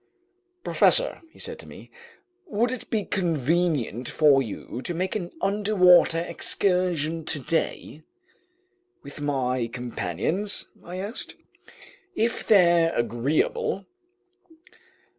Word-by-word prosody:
"Professor," - - +3
he - - -21
said - - -2
to - - -10
me, - - -13 0.6
"would 240 -3 0
it 255 - -6
be 215 -2 0
convenient 160 - 0
for 145 -3 +4
you 120 +1 -6
to 175 - -4
make 185 +4 -2
an 180 -5 -3
underwater 195 -4 +4
excursion 175 -3 0
today?" 155 +1 -2 1.0
"With - - -10
my 130 -4 -1
companions?" 125 - -3 0.2
I 175 - -8
asked. 200 +5 -5 0.8
"If 230 -3 -1
they're 175 -5 +5
agreeable." 150 - -1
170 Hz, 100 wpm, -25 LUFS, 140-200 Hz, 1.0 s, they're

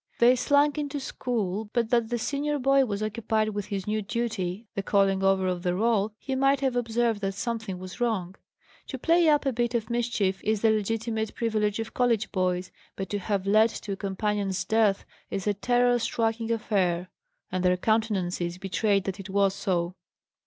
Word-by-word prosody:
They 245 +2 +6
slunk 285 +3 +3
into 290 -1 -3
school. 220 -6 -3
But 230 -2 0
that 235 -2 +2
the 240 - 0
senior 290 +5 -1
boy 275 0 +4
was 210 -2 -3
occupied 215 0 0
with 205 -2 -4
his 195 -2 -3
new 215 +1 -1
duty 210 -2 -3
the 195 - -2
calling 195 -1 +2
over 195 -1 +3
of 180 -1 -1
the 180 0 0
roll 220 0 +1
he 270 - -5
might 275 +1 +3
have 265 -2 0
observed 235 -2 0
that 195 -1 -2
something 220 -3 -3
was 185 +5 -9
wrong. 200 -7 0 0.5
To 265 - -5
play 330 +4 +4
up 295 -1 +3
a 270 - +1
bit 240 +1 -1
of 225 0 -2
mischief 230 -5 0
is 215 -1 0
the 225 - +4
legitimate 220 +1 -1
privilege 215 -3 0
of 225 -1 -5
college 235 -3 +1
boys; 185 -1 -1 0.2
but 190 -2 -5
to 205 - -1
have 195 -1 -2
led 215 +3 +5
to 215 - -7
a - - -1
companion's 195 0 -2
death 220 -3 +2 0.2
is 195 -2 -3
a 205 - +2
terror 245 +4 +2
striking 225 0 -1
affair; 185 -5 0 0.4
and 185 -1 -1
their 180 0 +3
countenances 185 -5 0
betrayed 195 +1 +1
that 195 +1 -4
it 195 0 -8
was 195 0 +2
so. 180 -3 -1
215 Hz, 190 wpm, -27 LUFS, 195-235 Hz, 0.5 s, They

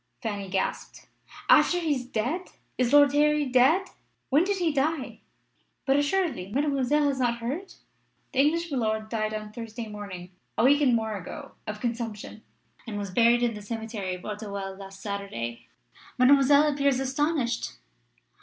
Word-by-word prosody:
Fanny 205 -4 -3
gasped. 190 0 -3 0.4
"After 355 - +5
he 320 -4 +1
is 255 -3 -4
dead! 255 +11 -2 0.3
Is 250 -1 +1
Lord 285 -1 +6
Harry 300 0 +3
dead? 270 +9 +4 0.4
When 290 +5 +5
did 400 +1 0
he 340 -4 +1
die?" 290 +1 -1 0.7
"But, 270 - +3
assuredly, 285 - 0
Mademoiselle 285 +2 +1
has 270 -1 -2
not 240 -2 +1
heard? 280 +12 -5 0.6
The 265 - 0
English 330 +4 +2
milord 220 -4 -1
died 215 -1 -1
on 215 -1 -5
Thursday 230 +1 -7
morning, 200 -4 -8 0.3
a 220 - +3
week 285 +3 +5
and 255 -4 +4
more 220 -2 -1
ago, 185 -4 -8 0.2
of 210 0 -4
consumption, 230 -3 -4 0.5
and 210 -2 -4
was 200 -2 -4
buried 235 +4 +4
in 235 -1 +1
the 210 - -8
cemetery 220 -3 -4
of 180 - -12
Auteuil 200 -2 -5
last 195 0 -11
Saturday. 120 - -5 0.5
Mademoiselle 280 +3 +5
appears 280 -2 +2
astonished." 270 -2 -1
240 Hz, 155 wpm, -27 LUFS, 210-285 Hz, 0.7 s, Lord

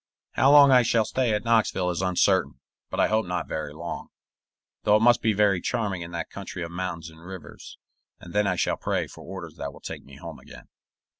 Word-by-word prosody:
How 135 +2 +4
long 145 -1 +8
I 125 -1 +7
shall 115 -1 +2
stay 125 +2 0
at 105 -1 0
Knoxville 110 -6 +2
is 85 - -3
uncertain, 90 -7 +2 0.3
but - - -4
I - - +4
hope 110 -2 0
not 90 -1 -3
very 75 -2 -4
long 85 +3 -6 0.7
though 105 - +4
it 105 - +3
must 120 0 +5
be 110 - +2
very 100 -3 +2
charming 100 -5 -2
in 85 - -6
that 85 -1 -5
country 95 -2 -6
of 85 - -6
mountains 85 -2 -5
and 80 +1 -16
rivers 95 -1 -10 0.4
and 85 - -12
then 105 0 +2
I 90 - +1
shall - - 0
pray - - -1
for - - -13
orders 85 -5 -8
that 70 0 -5
will - - -14
take - - -7
me 70 - -14
home 70 - -9
again. - - -14
95 Hz, 220 wpm, -26 LUFS, 85-110 Hz, 0.7 s, long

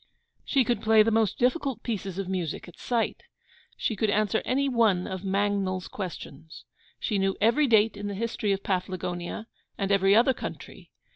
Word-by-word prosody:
She 270 -3 +2
could 235 -2 -1
play 220 -1 +5
the 225 - +1
most 220 -2 +2
difficult 260 +1 0
pieces 195 -5 -4
of 195 -2 -3
music 180 -4 -3
at 175 - -14
sight. 235 -2 -1 0.6
She 220 - -1
could 215 +2 0
answer 215 +1 +1
any 275 +2 +1
one 225 -8 +2
of 190 -1 -5
Mangnall's 195 -1 0
Questions. 160 -5 -8 0.3
She 210 -4 -1
knew 195 0 0
every 235 +8 +3
date 220 -2 +4
in 205 0 -5
the 200 - -4
history 220 -1 -1
of 195 0 -1
Paflagonia, 180 +1 -3 0.3
and 195 0 -1
every 195 0 +4
other 245 +4 +5
country. - - -8
205 Hz, 170 wpm, -27 LUFS, 190-225 Hz, 0.6 s, play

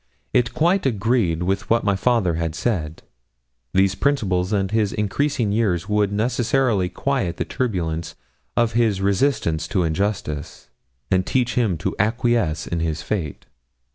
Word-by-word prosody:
It 120 -2 +2
quite 175 +1 +2
agreed 110 -7 +1
with 95 +2 -1
what 115 +1 +3
my 100 -1 +2
father 105 -4 +2
had 80 -1 -2
said. 80 -4 -2 0.7
These 95 0 +3
principles 100 -7 0
and 100 -2 0
his 110 -2 +1
increasing 115 +2 0
years 100 -5 0
would 105 -1 +1
necessarily 115 -2 +1
quiet 125 -7 -1
the - - -1
turbulence 85 -9 -2 0.4
of 120 -1 +2
his 110 -4 +2
resistance 95 - +1
to 90 - 0
injustice, 80 - -3 0.4
and 95 0 +3
teach 120 +2 0
him 110 -9 +1
to 80 - -3
acquiesce 110 -7 +1
in 85 - -2
his 80 -2 -2
fate. 85 -5 -3
100 Hz, 140 wpm, -22 LUFS, 85-120 Hz, 0.7 s, what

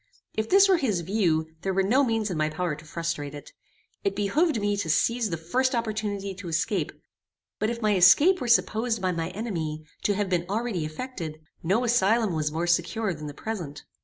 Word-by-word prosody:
If 220 0 -2
this 395 +1 +7
were 380 -2 +4
his 210 - 0
view 165 -4 0
there 190 0 -2
were 195 - +3
no 250 +9 +3
means 225 -5 0
in - - -2
my 155 0 +1
power 165 +1 -2
to 155 +2 -10
frustrate 160 -3 -4
it. 145 - -10 0.5
It 195 0 0
behoved 250 - +1
me 205 0 0
to 190 -5 -3
seize 230 +7 +2
the 165 - -2
first 255 - 0
opportunity 210 -4 -2
to 185 -1 -9
escape; 165 +1 -1 0.7
but 215 - +1
if 235 -1 -4
my 210 -1 +3
escape 290 - +6
were 250 - -2
supposed 230 0 +2
by 185 -1 0
my 165 -1 -2
enemy 170 -7 -4 0.2
to 205 - +2
have 205 0 0
been 175 -2 -1
already 210 -6 -1
effected, 160 -3 -6 0.2
no 195 +9 +1
asylum 225 -3 +2
was 155 -2 -1
more 165 +3 -1
secure 175 +4 0
than 150 -1 -7
the 145 - -8
present. 170 -10 -5
195 Hz, 200 wpm, -26 LUFS, 165-225 Hz, 0.7 s, this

